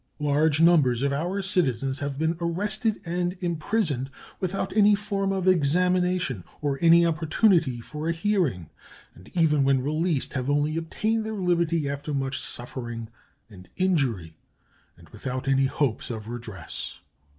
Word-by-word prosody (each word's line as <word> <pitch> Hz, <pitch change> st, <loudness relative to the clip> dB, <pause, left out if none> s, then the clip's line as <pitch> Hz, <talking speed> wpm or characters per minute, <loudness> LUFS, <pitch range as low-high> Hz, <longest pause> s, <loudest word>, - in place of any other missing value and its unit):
Large 150 Hz, +1 st, +2 dB
numbers 140 Hz, -8 st, +4 dB
of 140 Hz, 0 st, +1 dB
our 180 Hz, +7 st, -2 dB
citizens 135 Hz, -, 0 dB
have 140 Hz, -1 st, -3 dB
been 160 Hz, +2 st, 0 dB
arrested 205 Hz, +6 st, 0 dB
and 175 Hz, +2 st, -2 dB
imprisoned 170 Hz, -, -1 dB, 0.3 s
without 190 Hz, +1 st, -3 dB
any 210 Hz, -1 st, +6 dB
form 200 Hz, -1 st, -2 dB
of 190 Hz, -1 st, -1 dB
examination 180 Hz, -, +2 dB, 0.2 s
or 140 Hz, -2 st, -1 dB
any 170 Hz, 0 st, +6 dB
opportunity 165 Hz, -, +2 dB
for 150 Hz, +6 st, -5 dB
a -, -, +3 dB
hearing, 165 Hz, -, -1 dB, 0.4 s
and 90 Hz, +4 st, -16 dB
even 150 Hz, -4 st, +3 dB
when 135 Hz, -1 st, +2 dB
released 155 Hz, +1 st, 0 dB
have 130 Hz, 0 st, -2 dB
only 145 Hz, +2 st, +1 dB
obtained 215 Hz, +7 st, -1 dB
their 220 Hz, 0 st, -4 dB
liberty 170 Hz, -5 st, +1 dB
after 145 Hz, +1 st, -3 dB
much 135 Hz, -1 st, -2 dB
suffering 120 Hz, -2 st, -6 dB, 0.4 s
and 95 Hz, -5 st, -14 dB
injury, 130 Hz, -, 0 dB, 0.6 s
and -, -, -17 dB
without 130 Hz, +1 st, -5 dB
any 135 Hz, 0 st, +3 dB
hope 135 Hz, -4 st, -1 dB
of 110 Hz, -3 st, -6 dB
redress. 115 Hz, -8 st, -7 dB
155 Hz, 140 wpm, -26 LUFS, 135-180 Hz, 0.6 s, any